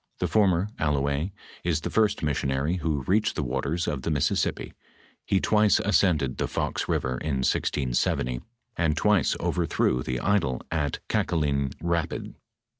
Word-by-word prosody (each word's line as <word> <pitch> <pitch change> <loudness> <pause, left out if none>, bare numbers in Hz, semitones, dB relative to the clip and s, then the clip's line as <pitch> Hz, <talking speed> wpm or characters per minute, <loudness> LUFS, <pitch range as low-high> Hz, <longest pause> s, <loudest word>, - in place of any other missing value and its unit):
Tlie - - 0
former, 100 -2 +3
Allouez, 70 +2 0 0.3
is 80 -3 0
the - - -4
first 110 -6 +2
missionary 70 +2 0
who 75 -5 -1
reached 105 +9 +1
the 75 - -1
waters 70 +7 -2
of 75 -3 -2
the 80 - -2
Mississippi; 75 -4 0 0.5
he 95 - +3
twice 105 0 +4
ascended 85 -10 +2
the - - 0
Fox - - -2
river 65 -1 0
in 65 -4 -1
1670, 60 -2 0 0.3
and 80 -3 +1
twice 105 -3 +3
overthrew 60 - +1
the 65 0 -2
idol 85 -11 +1
at 75 -4 -1
Kaka - - 0
lin 70 -4 0
rapid. 85 -1 -2
75 Hz, 145 wpm, -26 LUFS, 70-90 Hz, 0.5 s, twice